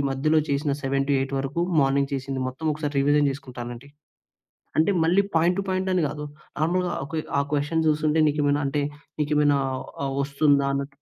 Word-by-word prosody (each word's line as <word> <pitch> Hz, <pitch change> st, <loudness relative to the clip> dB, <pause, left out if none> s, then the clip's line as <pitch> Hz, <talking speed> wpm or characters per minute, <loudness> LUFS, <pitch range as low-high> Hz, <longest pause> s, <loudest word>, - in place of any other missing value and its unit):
మధ్యలో 155 Hz, +4 st, +2 dB
చేసిన 140 Hz, +1 st, 0 dB
7-8 135 Hz, 0 st, 0 dB
వరకు 140 Hz, +5 st, -2 dB, 0.2 s
మార్నింగ్ 140 Hz, +1 st, +2 dB
చేసింది 135 Hz, 0 st, -3 dB
మొత్తం 135 Hz, +5 st, -6 dB
ఒకసారి 150 Hz, -1 st, -4 dB
రివిజన్ 145 Hz, +1 st, +3 dB
చేసుకుంటానండి. 125 Hz, -1 st, -7 dB, 0.9 s
అంటే 160 Hz, +6 st, +4 dB
మళ్ళీ 180 Hz, +5 st, +4 dB
పాయింట్ 175 Hz, +3 st, +3 dB
టు -, -, -1 dB
పాయింట్ 185 Hz, 0 st, -1 dB
అని 180 Hz, -, +2 dB
కాదు. 150 Hz, +1 st, -6 dB, 0.4 s
నార్మల్‌గా 175 Hz, +3 st, +1 dB
ఆహ్, 150 Hz, +4 st, -6 dB, 0.2 s
ఆ -, -, +3 dB
క్వెషన్ 150 Hz, +3 st, +1 dB
చూస్తుంటే, 155 Hz, +1 st, +2 dB
నీకు 150 Hz, +1 st, -1 dB
ఏమైనా 145 Hz, +1 st, +2 dB
అంటే 145 Hz, +1 st, 0 dB, 0.4 s
నీకు 150 Hz, 0 st, -1 dB
ఏమైనా 145 Hz, -1 st, +4 dB, 0.5 s
ఆహ్, 135 Hz, -, -2 dB
వస్తుందా 140 Hz, 0 st, +2 dB
అన్నటు. 140 Hz, 0 st, -3 dB
145 Hz, 160 wpm, -25 LUFS, 135-155 Hz, 0.9 s, అంటే